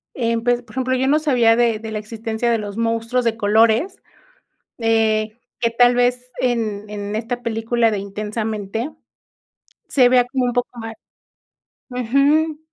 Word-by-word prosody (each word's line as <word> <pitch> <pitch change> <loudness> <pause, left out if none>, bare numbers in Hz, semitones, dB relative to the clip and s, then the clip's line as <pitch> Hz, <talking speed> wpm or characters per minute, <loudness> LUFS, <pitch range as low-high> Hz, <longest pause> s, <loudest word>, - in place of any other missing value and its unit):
eh, 230 -2 0
pues, 245 0 +1
por 215 - -18
ejemplo, 260 0 0
yo 260 +1 0
no 290 +3 +4
sabía 250 -7 +3
de 230 -2 +2
de 220 0 -7
la - - -2
existencia 225 +2 -3
de 230 - +2
los 205 -2 -6
monstruos 230 +2 0
de 230 -1 0
colores, 225 - +2 0.8
eh, 220 -1 +1 0.2
que 230 - +2
tal 245 +1 +4
vez 245 +1 0
en 220 -4 -1
en 205 0 -5
esta 240 +3 -3
película 230 0 +1
de 210 - -2
Intensamente 215 +4 -4 1.0
se 250 -3 +4
vea 250 -1 +4
como 255 0 -1
un 245 - -1
poco 245 -1 0
más 225 0 -7 1.0
ujú, 280 +6 +2
230 Hz, 155 wpm, -20 LUFS, 220-245 Hz, 1.0 s, no